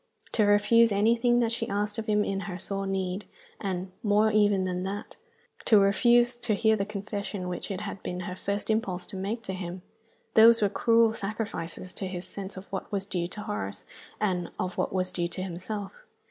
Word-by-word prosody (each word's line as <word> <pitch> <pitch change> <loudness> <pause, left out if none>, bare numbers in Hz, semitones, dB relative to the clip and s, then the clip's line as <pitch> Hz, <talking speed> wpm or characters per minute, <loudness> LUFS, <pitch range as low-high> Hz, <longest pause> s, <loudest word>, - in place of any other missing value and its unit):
To 215 - +3
refuse 205 +3 +5
anything 235 +4 +3
that 230 -1 +1
she 230 -1 -3
asked 205 +2 -1
of 220 - -5
him 210 -1 +3
in 195 0 -1
her 180 - -4
sore 195 +2 -3
need 190 0 -2 0.3
and, 185 -2 -3
more 210 +1 +3
even 205 -2 +3
than 180 -1 -2
that, 195 +2 -5 0.5
to 220 - +6
refuse 240 +5 +4
to 235 -3 0
hear 220 +1 +3
the 200 -1 -2
confession 200 -2 -4
which 180 +3 -4
it 195 -2 -3
had 200 -2 -6
been 180 0 -4
her 180 +1 -5
first 200 +3 -2
impulse 190 -5 -1
to - - -9
make 205 +5 -3
to 190 - -4
him 180 -1 -6 0.5
these 230 +1 +8
were 205 - +3
cruel 230 +2 +4
sacrifices 195 -5 -4
to 195 - -4
his 180 -1 -5
sense 195 +1 -6
of 190 - -8
what 190 - -4
was 200 -1 -1
due 175 -3 -2
to 210 +4 -7
Horace 205 - -4 0.3
and 180 -4 0
of 185 -1 -2
what - - -1
was 185 -1 0
due 175 -2 -1
to 185 +2 -5
himself. 195 +3 -5
200 Hz, 200 wpm, -28 LUFS, 185-215 Hz, 0.5 s, these